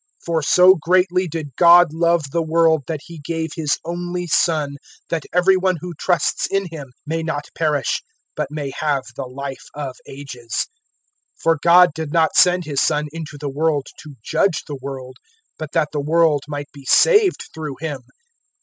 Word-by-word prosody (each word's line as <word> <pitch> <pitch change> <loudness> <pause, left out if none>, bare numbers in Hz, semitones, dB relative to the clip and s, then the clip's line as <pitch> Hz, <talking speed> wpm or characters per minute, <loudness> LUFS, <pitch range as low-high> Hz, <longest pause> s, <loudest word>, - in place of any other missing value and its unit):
003:016 - - -24
For 165 -1 0
so 180 +5 +6
greatly 180 +2 +2
did 150 -5 -6
God 175 -2 +7
love 170 -3 +1
the 170 - 0
world 160 -1 +3
that 155 -3 -4
He 170 -2 -11
gave 160 +1 -4
His 155 -4 -1
only 175 +1 -4
Son, 150 -3 +1 0.3
that 165 -3 -2
every 180 +2 +4
one 185 -1 +1
who 180 +1 -7
trusts 170 0 0
in 195 0 -1
Him 145 -5 -8
may 165 +2 -2
not 150 -3 -4
perish 150 -4 0 0.3
but - - -3
may 145 -2 -5
have 145 -4 0
the 135 - -5
Life 135 +1 -7
of 140 -3 -5
Ages. 130 -4 -5 0.7
003:017 - - -22
For 165 -2 +2
God 175 0 +6
did 160 -1 -5
not 160 -1 +2
send 180 -1 +4
His 145 -3 -1
Son 150 0 +1
into 155 -2 -8
the 145 0 -5
world 145 0 0
to 150 -3 -11
judge 195 +4 0
the 145 -3 -7
world, 130 -1 -7 0.4
but 155 -2 -6
that 155 -2 +1
the 145 - -2
world 155 -1 +2
might 145 -1 -6
be 140 -1 -13
saved 420 - +4
through 155 -3 -6
Him. 150 -5 -4
160 Hz, 180 wpm, -20 LUFS, 145-170 Hz, 0.7 s, God